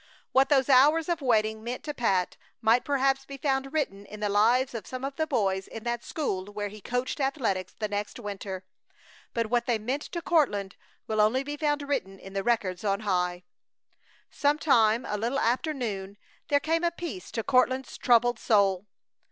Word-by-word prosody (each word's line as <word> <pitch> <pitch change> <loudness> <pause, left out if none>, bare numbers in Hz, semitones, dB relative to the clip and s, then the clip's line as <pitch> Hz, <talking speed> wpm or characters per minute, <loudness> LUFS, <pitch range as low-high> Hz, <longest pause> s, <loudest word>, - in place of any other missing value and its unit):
What 265 +1 +4
those 270 -3 +4
hours 295 +5 +5
of 340 -2 0
waiting 220 -4 +1
meant 245 +2 -5
to 295 - -4
Pat 195 -9 0 0.2
might 230 +2 +3
perhaps 270 -1 +1
be 275 0 -9
found 270 -1 -1
written 205 -11 -2
in 210 - -9
the 210 -1 -1
lives 235 +6 +3
of 225 -4 -6
some 255 +1 -5
of 275 0 -5
the 315 -1 -1
boys 195 -8 0
in 225 - -8
that 235 0 -2
school 195 -12 -2
where 205 0 -5
he 210 +1 -11
coached 245 +6 -2
athletics 255 -9 -1
the 215 - -2
next 205 0 -4
winter. 200 -4 -6 0.7
But 230 -1 -1
what 240 -1 +1
they 240 -2 +2
meant 250 +7 -2
to 340 - -5
Courtland 205 - +1 0.3
will 215 -1 +1
only 235 +6 +3
be 290 +1 -4
found 295 -1 0
written 195 -10 -2
in 195 0 -12
the 195 - -1
records 200 -6 0
on 200 0 0
high. 180 -3 -1 0.9
Some 290 +1 +2
time 230 -6 +3
a 210 - -2
little 235 +5 -1
after 260 +5 +1
noon 205 -8 -4 0.3
there 290 -3 +3
came 325 +3 0
a 345 - +3
peace 335 - -7
to 225 - -2
Courtland's 260 0 +2
troubled 240 -1 +3
soul. 200 -2 +2
235 Hz, 190 wpm, -28 LUFS, 205-275 Hz, 0.9 s, hours